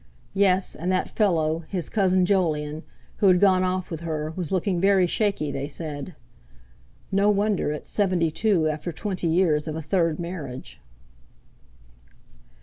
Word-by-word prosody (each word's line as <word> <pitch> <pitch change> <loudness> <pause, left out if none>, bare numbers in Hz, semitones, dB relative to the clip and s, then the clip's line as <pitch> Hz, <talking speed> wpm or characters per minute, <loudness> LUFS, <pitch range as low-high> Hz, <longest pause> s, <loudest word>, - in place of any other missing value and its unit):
Yes, 190 -1 +2
and 180 +4 -3
that 185 - 0
fellow, 165 -6 +1
his 180 -4 -3
cousin 185 -3 +2
Jolyon, 155 -5 0 0.4
who 200 - +3
had 180 -1 +5
gone 185 -2 +4
off 185 0 -2
with 165 - -4
her, 155 -2 -3
was 175 -5 -4
looking 185 -1 0
very 195 -1 +4
shaky, 195 -5 0
they 140 +1 -4
said. 150 +1 -6 1.0
No 200 +1 +3
wonder, 205 -5 +1
at 150 - -6
seventy 180 -5 +1
two, 185 -3 +2
after 155 +3 -3
twenty 185 +1 -3
years 160 -3 +2
of 155 - -3
a 160 - -4
third 165 0 0
marriage! 160 -7 -7
175 Hz, 145 wpm, -24 LUFS, 155-190 Hz, 1.0 s, had